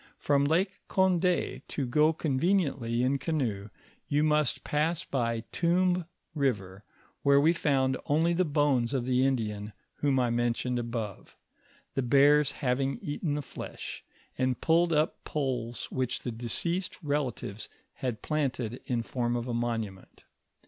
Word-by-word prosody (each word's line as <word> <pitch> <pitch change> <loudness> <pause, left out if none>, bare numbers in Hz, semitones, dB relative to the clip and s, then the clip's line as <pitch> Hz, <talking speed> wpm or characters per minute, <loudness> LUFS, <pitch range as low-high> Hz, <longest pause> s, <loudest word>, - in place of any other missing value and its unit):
From 140 -1 +2
Lake 185 +6 +1
Cond^, 180 -1 +2
to 140 - -2
go 150 +6 +4
conveni 160 +2 +1
ently 115 -2 -2
in 135 +2 +1
canoe, 115 -12 -2 0.4
you 145 +1 +2
must 150 -3 +2
pass 155 +3 0
by 115 -3 -1
Tomb 180 +1 +2 0.3
river, 105 - -1 0.4
where 140 0 +5
we 160 +4 +4
found 135 -5 +1
only 160 +4 +3
the 180 +2 +2
bones 145 -5 +1
of 125 -2 -1
the 130 0 +2
Indian 105 -6 -1 0.2
whom 140 -2 +2
I 125 -2 +2
mentioned 120 +1 0
above, 115 -4 -5 0.6
the 135 - 0
bears 140 +3 +5
having 135 0 -1
eaten 145 +1 -2
the 145 - -3
flesh, - - -7 0.4
and 130 -1 +1
pulled 170 +1 +3
up 155 +1 +1
poles 125 -5 -2
which 130 -2 -1
the 125 - -2
deceased's 170 - -2
relatives 130 -8 -2 0.2
had 125 -4 -4
planted 130 -6 -2
in 120 -2 0
form 120 0 -1
of 120 0 -2
a 120 - -2
monument. 115 -5 -4
135 Hz, 140 wpm, -29 LUFS, 120-150 Hz, 0.6 s, where